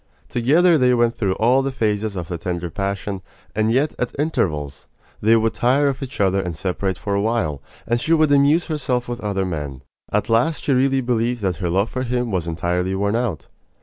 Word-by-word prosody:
Together 155 +8 +4
they 125 -1 +4
went 120 -1 +2
through 100 -4 0
all 125 +4 +3
the 135 0 -2
phases 105 -4 -1
of 90 -3 -4
the 90 - -4
tender 85 0 -4
passion; 100 0 -3 0.3
and 110 +1 +1
yet, 140 +5 +1
at 125 - -2
intervals, 75 - -2 0.3
they 110 +2 +5
would 115 0 +2
tire 140 +4 +2
of 135 - -4
each 135 0 -7
other 95 -1 +2
and 90 -3 -4
separate 95 +2 -2
for 100 - -3
a 100 - +1
while, 100 - -1 0.2
and 120 +1 0
she 140 - -2
would 155 -2 +4
amuse 145 +4 +4
herself 130 -6 -1
with 120 0 -5
other 100 -2 -1
men. 75 -6 -5 0.3
At 105 0 0
last 120 +8 +1
she 140 - +2
really 135 +1 +2
believed 120 -1 -1
that 90 -3 0
her 90 0 -2
love 95 +5 +1
for 130 - -3
him 125 -2 -1
was 90 -3 -1
entirely 90 +3 -1
worn 100 +2 0
out. 115 -9 -2
110 Hz, 210 wpm, -21 LUFS, 95-125 Hz, 0.3 s, they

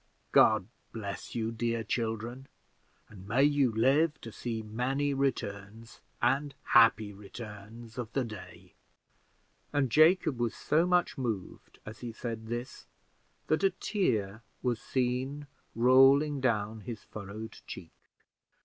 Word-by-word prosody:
God - - +5 0.3
bless 100 -3 -6
you, 115 -1 -1
dear 115 0 -1
children, 115 +3 -3 0.6
and 100 -3 -13
may 120 +6 +3
you 145 -4 +3
live 140 +8 +2
to 115 - -8
see 115 0 -4
many 130 +6 -1
returns, 115 -4 -3 0.2
and 140 +2 +1
happy 110 -2 +5
returns, 110 +3 -10
of 120 -2 -5
the 135 - +1
day;" 110 -5 -10 1.0
and 145 -4 +1
Jacob 155 -3 +4
was 120 -2 -1
so 165 +3 +2
much 180 -5 +1
moved 110 -7 -5
as 110 +1 -9
he 120 -1 -6
said 115 -1 -6
this, 120 +2 -6 0.6
that 155 +4 +1
a 195 - +6
tear 110 - -1 0.2
was 120 -3 0
seen 130 +3 -1 0.3
rolling 135 +4 +5
down 110 -3 0
his 110 +1 -7
furrowed 110 +2 -8
cheek. 80 - -8
120 Hz, 125 wpm, -30 LUFS, 110-135 Hz, 1.0 s, a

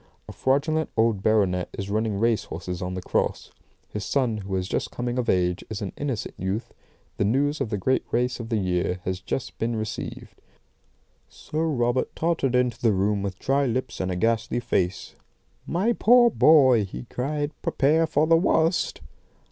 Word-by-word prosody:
A - - -7
fraudulent 155 +4 0
old 110 -3 +2
baronet 95 -4 +2
is 100 +1 -4
running 110 -1 0
race 115 +1 +1
horses 90 +2 -6
on 90 0 -3
the 95 - -5
cross. - - -1 0.4
His 105 - -5
son, 120 0 0
who 95 -2 -4
is 95 -1 -2
just - - -2
coming 120 +1 -3
of 125 - -1
age, 90 0 +1
is 105 -2 -4
an 95 - -5
innocent 135 -7 -3
youth. 95 +5 -3 0.4
The - - +1
news 140 +8 +1
of - - -1
the 105 - -1
great 130 +7 +1
race 125 +1 0
of 115 -1 -6
the 115 - +1
year 90 -2 -1
has 95 0 -2
just 120 +6 -4
been 115 +1 -1
received. 110 -1 -6 0.9
"Sir 160 +2 -3
Robert 120 -4 0
tottered 160 -6 0
into 125 -2 +1
the 115 -3 +3
room 100 +1 +1
with 95 -1 -4
dry 140 +4 +1
lips 125 0 -3
and 95 - -1
a 90 - -2
ghastly 115 +4 0
face. 95 -6 -1 0.5
"'My 195 +8 +1
poor 240 +1 +5
boy!' 130 - +6
he 65 -11 -7
cried. 145 - -3
'Prepare 155 +4 +2
for 155 -1 +2
the 165 +1 +5
worst! 165 0 +1
115 Hz, 180 wpm, -25 LUFS, 100-140 Hz, 0.9 s, boy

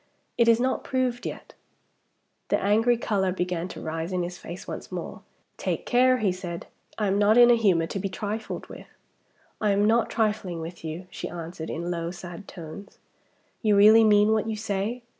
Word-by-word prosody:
It 235 -1 +3
is 230 0 +5
not 260 +1 0
proved 255 -2 -1
yet." - - -8 0.9
The - - +1
angry 225 +4 +3
color 195 -5 0
began 180 -1 -2
to - - -9
rise 160 +2 -4
in 180 -1 0
his 175 +1 -5
face 175 0 -9
once - - -7
more. - - -6 0.4
"Take - - -3
care," 255 +1 +4
he 210 -6 +1
said; 180 -2 -6 0.3
"I 215 - 0
am 195 0 +1
not 210 +2 +4
in 240 0 +8
a - - +6
humor 190 -8 +3
to 195 - -4
be 195 +1 -2
trifled 210 +3 -4
with." - - -11 0.7
"I 210 - +2
am 200 +1 +3
not 230 +2 +3
trifling 210 -6 -1
with 165 +1 -8
you," 160 +3 -5
she - - -6
answered, 165 -1 -7
in 170 +2 -3
low, 170 -1 -3
sad 175 +2 -9
tones. 175 +3 -10 0.6
"You 215 -3 +3
really 215 +3 +7
mean 210 0 +5
what 220 0 +1
you 220 - -2
say?" 210 +3 -3
200 Hz, 190 wpm, -26 LUFS, 175-220 Hz, 0.9 s, in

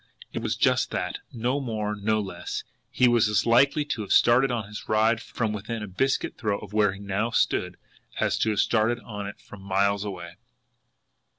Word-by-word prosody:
It - - -3
was - - -1
just - - +2
that, - - -3
no 125 +4 -1
more, 110 -5 -2
no 110 +1 0
less 100 -2 -5 0.3
he 125 - +3
was 120 -2 +4
as 105 -2 +2
likely 140 +5 +4
to 145 -6 -3
have 100 - -6
started 130 +3 +5
on 115 -5 -2
his 105 0 -9
ride 110 +1 +3
from 110 -3 -3
within 110 +2 -4
a - - -5
biscuit 130 +8 -1
throw 105 -3 0
of 105 0 -11
where 105 -2 +3
he 100 - -10
now 100 +3 -1
stood, 105 - 0 0.4
as - - +1
to 110 - +2
have 105 -2 0
started 115 +1 +2
on 105 -1 -6
it 100 - -9
from 100 - -13
miles 100 +1 +1
away! 85 -4 -7
110 Hz, 195 wpm, -26 LUFS, 100-120 Hz, 0.4 s, started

